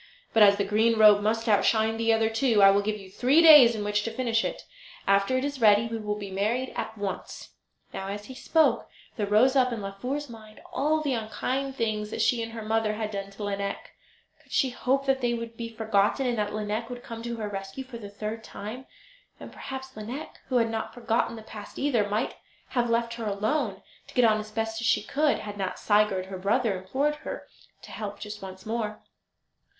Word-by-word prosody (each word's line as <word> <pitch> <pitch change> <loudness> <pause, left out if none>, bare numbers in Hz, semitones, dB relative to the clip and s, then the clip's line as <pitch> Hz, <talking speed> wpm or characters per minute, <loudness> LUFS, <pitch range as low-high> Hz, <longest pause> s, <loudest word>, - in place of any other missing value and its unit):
But 225 - +4
as 200 -1 +8
the 200 - 0
green 220 +3 +2
robe 210 -1 +7
must 225 +2 0
outshine 220 +1 +3
the 230 0 +2
other 225 0 +3
two 225 -2 +3
I 195 - +9
will 200 +1 +3
give 210 +1 -2
you 195 -2 -12
three 255 +9 +3
days 295 -8 +9
in 210 - -3
which 210 0 0
to 230 - -3
finish 230 -1 0
it. - - -4 0.4
After 200 +6 +3
it 260 - -1
is 285 -3 -4
ready 210 0 +6
we 230 0 -4
will 210 -1 -2
be 200 -2 -7
married 220 +7 -1
at 220 - -4
once." 200 -1 -5 0.4
Now, 195 - -5
as 205 +1 -5
he 260 - -9
spoke, 315 +4 +2 0.3
there 210 -4 -2
rose 235 +6 +4
up 255 -2 +4
in 235 - -3
Laufer's 250 +9 -4
mind 215 -3 -13
all 310 +2 +1
the 285 -3 0
unkind 255 +4 -2
things 215 -3 -1
that - - -5
she 240 -2 +2
and 225 0 -5
her 225 -1 -6
mother 220 0 0
had 215 -1 -3
done 200 -1 -5
to 200 +1 -9
Lineik. 200 -1 -4 0.5
Could - - -24
she 265 -3 +2
hope 270 +2 0
that 270 -1 +1
they 240 -1 +1
would 230 0 -6
be 230 0 -5
forgotten, 220 +3 +1
and 245 -2 0
that 210 0 -1
Lineik 215 +2 -3
would 245 0 -7
come 230 -1 -7
to 235 0 -4
her 220 -2 -4
rescue 195 +5 -6
for 255 -3 -9
the 205 -3 -8
third 215 +2 -5
time? 240 +6 -8 0.5
And - - -10
perhaps 265 0 -7
Lineik, 235 +8 -7
who 260 - -2
had 230 -1 +2
not 225 -1 -4
forgotten 230 -1 0
the 220 - -10
past 210 -1 -10
either, 240 -8 +1
might 215 +4 -1 0.3
have 240 -2 0
left 230 0 +1
her 235 -1 -5
alone, 210 +2 -1 0.2
to - - -15
get 250 - +5
on 215 -1 +4
as 215 0 -7
best 225 +1 -3
she 230 - +2
could, 300 +1 +1
had 205 -1 -7
not 190 -1 -2
Sigurd, 205 -3 +2
her 190 -1 -7
brother, 210 +2 +1
implored 270 +11 -1
her - - -7 0.4
to - - -11
help 205 -2 -6
just 210 0 -7
once 190 -1 -9
more. 220 -1 -3
225 Hz, 220 wpm, -27 LUFS, 210-245 Hz, 0.5 s, I